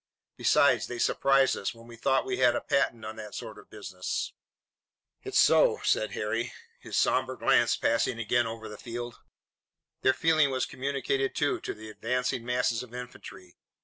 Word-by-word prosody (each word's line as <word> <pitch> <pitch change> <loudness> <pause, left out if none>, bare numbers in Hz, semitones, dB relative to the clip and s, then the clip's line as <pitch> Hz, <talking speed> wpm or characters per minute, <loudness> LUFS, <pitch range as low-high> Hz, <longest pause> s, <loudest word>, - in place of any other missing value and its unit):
Besides, 130 -4 +3
they 120 - -5
surprised 135 +3 +3
us, 100 - -4
when 115 0 -15
we 120 0 -12
thought 135 +3 +1
we 130 -1 -2
had 125 -2 +4
a - - -1
patent 120 -5 0
on 110 +1 -7
that 105 -2 -8
sort - - -7
of - - -17
business." 95 -4 -4 0.9
"It's - - -2
so," - - +5
said 110 - +1
Harry, 115 +3 -2 0.3
his - - -5
somber - - +2
glance - - +3
passing 115 +1 +1
again 115 +1 +1
over 115 0 -7
the 105 0 -10
field. 120 0 -6 0.8
Their 130 - +3
feeling 155 -1 +3
was 130 -1 0
communicated, 135 0 -2
too, 145 -1 +1
to - - -5
the 110 0 -10
advancing 125 +2 -2
masses 125 -1 0
of 125 -1 -10
infantry. 125 -7 -10
120 Hz, 170 wpm, -28 LUFS, 110-130 Hz, 0.9 s, so